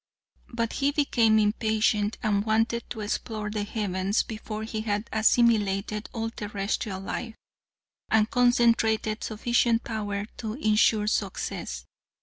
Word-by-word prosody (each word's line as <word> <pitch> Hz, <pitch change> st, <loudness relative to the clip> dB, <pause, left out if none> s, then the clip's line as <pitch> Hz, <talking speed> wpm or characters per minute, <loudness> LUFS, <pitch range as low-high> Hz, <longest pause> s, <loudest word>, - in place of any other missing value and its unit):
But 230 Hz, -1 st, -2 dB
he 280 Hz, 0 st, +1 dB
became 235 Hz, -7 st, +3 dB
impatient, 215 Hz, 0 st, +1 dB
and 205 Hz, -2 st, +1 dB
wanted 225 Hz, +2 st, 0 dB
to 220 Hz, -, -5 dB
explore 210 Hz, 0 st, -3 dB
the 210 Hz, -1 st, -2 dB
heavens 200 Hz, -1 st, -1 dB
before 215 Hz, -1 st, -6 dB
he 220 Hz, -1 st, -4 dB
had 210 Hz, 0 st, -2 dB
assimilated 215 Hz, -2 st, +2 dB
all 225 Hz, -1 st, -3 dB
terrestrial 205 Hz, -2 st, -3 dB
life, 220 Hz, +4 st, -5 dB, 0.7 s
and 220 Hz, -1 st, +3 dB
concentrated 230 Hz, -3 st, +2 dB
sufficient 235 Hz, +1 st, +1 dB
power 205 Hz, -2 st, -3 dB
to 220 Hz, -2 st, -4 dB
insure 215 Hz, -3 st, +3 dB
success. 185 Hz, -, -3 dB
220 Hz, 120 wpm, -27 LUFS, 210-230 Hz, 0.7 s, became